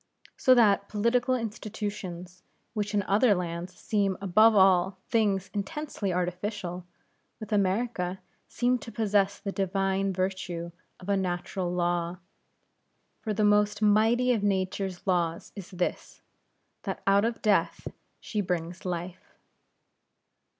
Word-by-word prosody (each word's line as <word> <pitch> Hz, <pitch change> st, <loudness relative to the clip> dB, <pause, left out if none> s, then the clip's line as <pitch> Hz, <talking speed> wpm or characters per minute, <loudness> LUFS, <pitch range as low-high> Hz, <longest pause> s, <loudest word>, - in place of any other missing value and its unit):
So 255 Hz, -, +5 dB
that 200 Hz, -4 st, +4 dB
political 240 Hz, +4 st, +1 dB
institutions, 205 Hz, -5 st, -5 dB, 0.3 s
which 210 Hz, -1 st, -2 dB
in 205 Hz, -, +2 dB
other 205 Hz, +3 st, +3 dB
lands 175 Hz, 0 st, -4 dB
seem 200 Hz, -4 st, 0 dB
above 215 Hz, +4 st, +5 dB
all 190 Hz, -1 st, +4 dB
things 200 Hz, -5 st, +1 dB
intensely 205 Hz, 0 st, -3 dB
artificial, 180 Hz, 0 st, -3 dB, 0.5 s
with 215 Hz, 0 st, -8 dB
America 195 Hz, -2 st, 0 dB, 0.3 s
seem 250 Hz, +1 st, +1 dB
to 230 Hz, -, -9 dB
possess 205 Hz, -2 st, +1 dB
the 200 Hz, -, -5 dB
divine 195 Hz, 0 st, 0 dB
virtue 185 Hz, -2 st, -3 dB, 0.3 s
of 185 Hz, -, -12 dB
a 200 Hz, -, +2 dB
natural 180 Hz, 0 st, -2 dB
law; 175 Hz, 0 st, -1 dB, 1.0 s
for 220 Hz, -, -3 dB
the 210 Hz, +1 st, 0 dB
most 210 Hz, 0 st, +3 dB
mighty 225 Hz, +4 st, +4 dB
of 225 Hz, -, 0 dB
nature's 190 Hz, -2 st, -1 dB
laws 170 Hz, -3 st, 0 dB
is 195 Hz, -3 st, -8 dB
this, 180 Hz, -2 st, -4 dB, 0.6 s
that -, -, -5 dB
out 200 Hz, +1 st, +4 dB
of 230 Hz, 0 st, -2 dB
Death 210 Hz, -2 st, +1 dB, 0.3 s
she 210 Hz, -, -3 dB
brings 175 Hz, -1 st, -3 dB
Life. 180 Hz, 0 st, -5 dB
195 Hz, 120 wpm, -28 LUFS, 180-210 Hz, 1.0 s, So